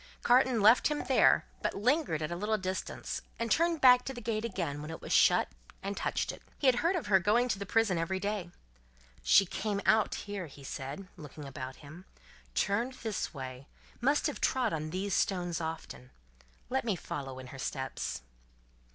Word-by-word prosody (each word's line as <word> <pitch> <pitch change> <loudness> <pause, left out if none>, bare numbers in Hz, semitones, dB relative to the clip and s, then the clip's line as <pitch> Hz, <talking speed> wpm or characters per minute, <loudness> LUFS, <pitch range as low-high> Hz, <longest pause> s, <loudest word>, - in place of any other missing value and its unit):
Carton 250 -2 +4
left 225 +4 +6
him 300 -1 -2
there; - - +4 0.2
but - - -1
lingered 235 - +1
at 155 - -3
a - - -2
little 210 +4 0
distance, 185 -1 -4 0.2
and 230 -1 -2
turned 335 -1 +2
back 250 -1 +7
to 270 - -5
the - - -6
gate 220 -1 -2
again 170 -10 -3
when 150 - -7
it 160 - -6
was - - -4
shut, - - +5 0.4
and 200 +1 -3
touched - - -1
it. - - -12 0.2
He - - -4
had 255 -2 +5
heard 335 +8 +2
of 345 - -2
her 200 -2 +5
going 215 +7 +3
to 210 - -1
the 200 - -5
prison 220 -6 +2
every 190 +3 -1
day. 200 -3 -2 0.7
"She 190 - +6
came 200 +2 -2
out 220 0 +3
here," 200 -4 -5
he 140 -1 -14
said, 140 +7 -6
looking 150 -1 -9
about 130 -1 -7
him, 170 +6 -12 0.5
"turned 235 +6 +1
this 220 -3 -2
way, 130 -2 -8 0.3
must 280 +4 +2
have 295 - -2
trod 255 -8 +1
on 155 -1 -3
these 190 +3 -2
stones 175 -4 0
often. 160 - -6 0.6
Let 265 +1 0
me 220 -5 0
follow 135 -5 -6
in 130 0 -9
her 135 - -9
steps." 130 - -4
195 Hz, 190 wpm, -31 LUFS, 155-235 Hz, 0.7 s, back